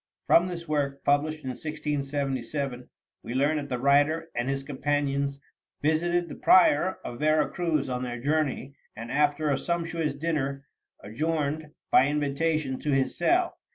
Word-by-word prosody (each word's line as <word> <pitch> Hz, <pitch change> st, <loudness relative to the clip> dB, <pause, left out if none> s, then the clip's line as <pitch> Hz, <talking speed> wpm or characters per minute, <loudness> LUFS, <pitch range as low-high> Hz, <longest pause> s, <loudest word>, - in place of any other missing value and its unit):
From 175 Hz, +2 st, +5 dB
this 170 Hz, -2 st, -6 dB
work, 140 Hz, -2 st, -1 dB
published 155 Hz, +2 st, +1 dB
in 130 Hz, -, -4 dB
1677, 140 Hz, -3 st, -3 dB, 0.3 s
we 120 Hz, -, -6 dB
learn 145 Hz, +4 st, +2 dB
that 145 Hz, -1 st, -4 dB
the 125 Hz, -, -1 dB
writer 145 Hz, +5 st, +2 dB
and 120 Hz, +2 st, -2 dB
his 135 Hz, 0 st, -2 dB
companions 140 Hz, 0 st, -1 dB, 0.4 s
visited 175 Hz, +3 st, +1 dB
the -, -, -8 dB
prior 185 Hz, 0 st, +4 dB
of 120 Hz, -, -6 dB
Vera 155 Hz, 0 st, +3 dB
Cruz 165 Hz, -6 st, -1 dB
on 125 Hz, -1 st, -3 dB
their 120 Hz, -1 st, -4 dB
journey, 140 Hz, -1 st, -1 dB, 0.2 s
and, 115 Hz, +1 st, -7 dB
after 150 Hz, +1 st, +2 dB
a 135 Hz, -, +1 dB
sumptuous 165 Hz, -3 st, -2 dB
dinner, 140 Hz, -3 st, -2 dB, 0.4 s
adjourned, 150 Hz, +6 st, -2 dB, 0.2 s
by 130 Hz, -, +6 dB
invitation, 145 Hz, -1 st, -1 dB
to 150 Hz, -, -4 dB
his 135 Hz, -2 st, +1 dB
cell. 350 Hz, -, +1 dB
145 Hz, 150 wpm, -27 LUFS, 135-155 Hz, 0.4 s, by